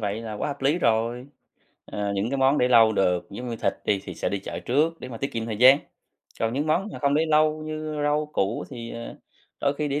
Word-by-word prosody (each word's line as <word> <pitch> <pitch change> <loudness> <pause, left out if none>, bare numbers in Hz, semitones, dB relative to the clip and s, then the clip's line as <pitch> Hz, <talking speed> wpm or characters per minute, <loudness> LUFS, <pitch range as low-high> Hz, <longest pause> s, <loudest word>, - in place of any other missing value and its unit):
vậy 105 +1 -2
là 110 -1 -6
quá - - -3
hợp 140 -1 -6
lý 145 +6 +2
rồi. 115 0 0 0.6
Ờ, 100 -1 -3
những 100 +5 -1
cái 140 - -1
món 135 +2 +3
để 125 - +3
lâu 115 -3 +6
được 90 -3 +1
giống 120 +5 -6
như 115 - -4
thịt - - 0
đi, 100 -2 +1
thì 90 - -7
sẽ - - -2
đi 100 - -2
chợ 95 - -6
trước 155 +6 0
để - - -7
mà 120 - -7
tiết 135 +4 -4
kiệm 115 0 -3
thời 110 -2 -3
gian. 130 +5 +7 0.6
Còn 115 0 0
những 145 +4 -1
món 175 +6 +1
mà - - -7
không 140 0 +1
để 160 +2 +2
lâu 155 0 +2
như 155 -1 -4
rau 150 +1 +1
củ 100 -1 -1
thì, 115 -1 -7
ờ, 115 0 -7 0.5
đôi 140 0 +1
khi 150 - 0
để 140 +1 -1
125 Hz, 260 wpm, -25 LUFS, 110-150 Hz, 0.6 s, gian